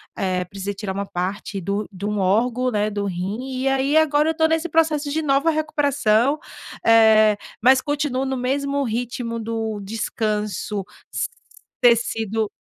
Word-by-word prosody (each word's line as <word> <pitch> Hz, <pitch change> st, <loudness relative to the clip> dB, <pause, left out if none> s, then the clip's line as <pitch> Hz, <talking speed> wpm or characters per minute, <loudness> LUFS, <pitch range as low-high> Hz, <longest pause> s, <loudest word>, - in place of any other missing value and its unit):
eh, 185 Hz, -2 st, -1 dB
precisa 195 Hz, +2 st, -5 dB
tirar 195 Hz, -2 st, -4 dB
um 200 Hz, 0 st, -2 dB
parte 195 Hz, +2 st, -4 dB
do 200 Hz, +3 st, -2 dB
de 195 Hz, +1 st, -7 dB
um 210 Hz, -1 st, -1 dB
órgão, 235 Hz, +6 st, +1 dB
né, 210 Hz, -1 st, 0 dB
do 205 Hz, 0 st, -2 dB
rim, 210 Hz, +9 st, -4 dB
e -, -, +1 dB
aí 270 Hz, +3 st, +2 dB
agora 305 Hz, 0 st, +3 dB
eu -, -, +3 dB
estou 320 Hz, 0 st, +2 dB
nesse 325 Hz, +1 st, 0 dB
processo 310 Hz, -2 st, +1 dB
de 315 Hz, +2 st, -1 dB
nova 280 Hz, +3 st, +2 dB
recuperação, 285 Hz, -5 st, +2 dB, 0.5 s
eh, 220 Hz, -2 st, +6 dB, 0.3 s
mas 260 Hz, +1 st, +6 dB
continuo 290 Hz, -3 st, -1 dB
no 265 Hz, -1 st, -2 dB
mesmo 280 Hz, +2 st, -1 dB
ritmo 235 Hz, 0 st, -3 dB
do 225 Hz, -1 st, -3 dB
descanso 210 Hz, -1 st, -2 dB, 0.3 s
s -, -, -1 dB, 0.5 s
ter 240 Hz, -1 st, +7 dB
sido 220 Hz, -2 st, -2 dB
230 Hz, 155 wpm, -22 LUFS, 210-280 Hz, 0.5 s, ter